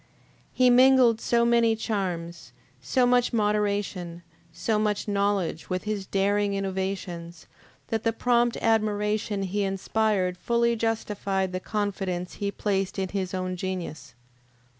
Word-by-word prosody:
He 255 -1 +4
mingled 250 -2 +5
so 235 0 +2
many 235 -1 +3
charms, 180 -6 -4 0.3
so 255 -2 +2
much 245 0 +3
moderation, 205 -5 -1 0.3
so 210 +6 -1
much 210 -1 -1
knowledge 200 -5 -1
with 185 0 -2
his 210 -3 -3
daring 200 +1 +1
innovations, 190 -3 -4 0.4
that 225 -1 -1
the 230 - +2
prompt 240 +1 +1
admiration 210 -2 +1
he 195 +2 -2
inspired 195 -1 0
fully 235 +2 +1
justified 205 -4 -1
the 185 - -3
confidence 195 -3 -3
he 200 - 0
placed 195 -2 -1
in 190 -1 -1
his 190 -1 -3
own 185 0 -2
genius. 175 -8 -5
205 Hz, 125 wpm, -26 LUFS, 185-225 Hz, 0.4 s, mingled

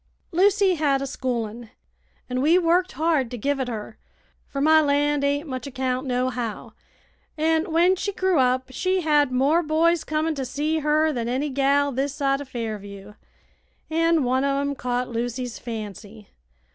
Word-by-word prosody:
"Lucy 390 +2 +3
had 290 -4 +1
a 275 - -3
schoolin', 240 -4 -4 0.6
an' 250 0 -2
we 320 +5 +4
worked 360 +1 +2
hard 305 -4 +1
to 245 - -6
give 280 +5 -1
it 260 - -1
her, 220 -2 -6 0.5
fer 275 - -5
my 315 +2 +5
land 290 0 +1
ain't 285 +2 0
much 260 0 -5
account, 260 0 -2
nohow. 250 -3 -2 0.6
An' 320 +3 +1
when 345 +3 +4
she 405 +2 -3
grew 375 -4 +1
up 255 0 +1
she 370 +7 0
had 295 -4 +3
more 275 +7 +3
boys 330 +1 +2
comin' 310 +1 -1
to 275 -3 -4
see 295 +5 -1
her 305 +1 +2
than 235 -3 -3
any 275 +4 -1
gal 280 +1 +2
this 275 +2 -2
side 275 -1 0
o' - - -6
Fairview, 210 -5 -7 0.8
an' 330 -1 +2
one 260 +2 +1
o' 275 0 +1
'em 280 0 -1
caught 250 -1 -2
Lucy's 245 +1 -4
fancy. 215 -2 -8
280 Hz, 165 wpm, -24 LUFS, 250-315 Hz, 0.8 s, my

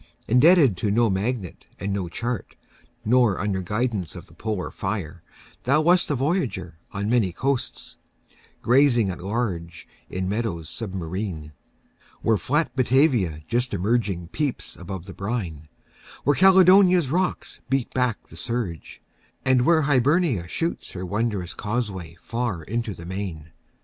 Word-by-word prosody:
Indebted 135 - +5
to 105 - -1
no 115 +1 +3
magnet 100 -1 -3
and 100 0 -2
no 95 -3 -2
chart, 120 +6 -4 0.5
Nor 120 -4 +3
under 95 -1 -1
guidance 105 -2 -2
of - - -9
the - - -19
polar 105 -5 -3
fire, 95 -4 -4 0.4
Thou 140 +5 +4
wast 175 +3 +4
a 145 - +1
voyager 130 - -2
on 100 0 -3
many 110 -5 +2
coasts, 130 +7 -3 0.7
Grazing 120 -5 +4
at 90 - -8
large 95 -5 -3 0.2
in 95 0 -3
meadows 100 -7 -2
submarine, 95 -5 -5 0.7
Where 110 -1 +3
flat 145 +3 0
Batavia 125 - +2
just 120 -1 0
emerging 100 -3 0
peeps 145 - -2
Above 90 0 -7
the 95 - -9
brine, 95 -8 -4 0.6
where 145 - +3
Caledonia's 185 -4 +6
rocks 180 +2 -1
Beat 135 -2 0
back 125 -4 0
the - - -13
surge, 115 -9 -4 0.4
and 130 -1 +3
where 165 -2 +5
Hibernia 140 - +2
shoots 165 - -3
Her 95 0 -5
wondrous 100 -2 -2
causeway 100 -7 -4
far 115 -8 -2
into 110 +2 -3
the 85 - -10
main. 90 -4 -5
110 Hz, 135 wpm, -24 LUFS, 95-130 Hz, 0.7 s, Caledonia's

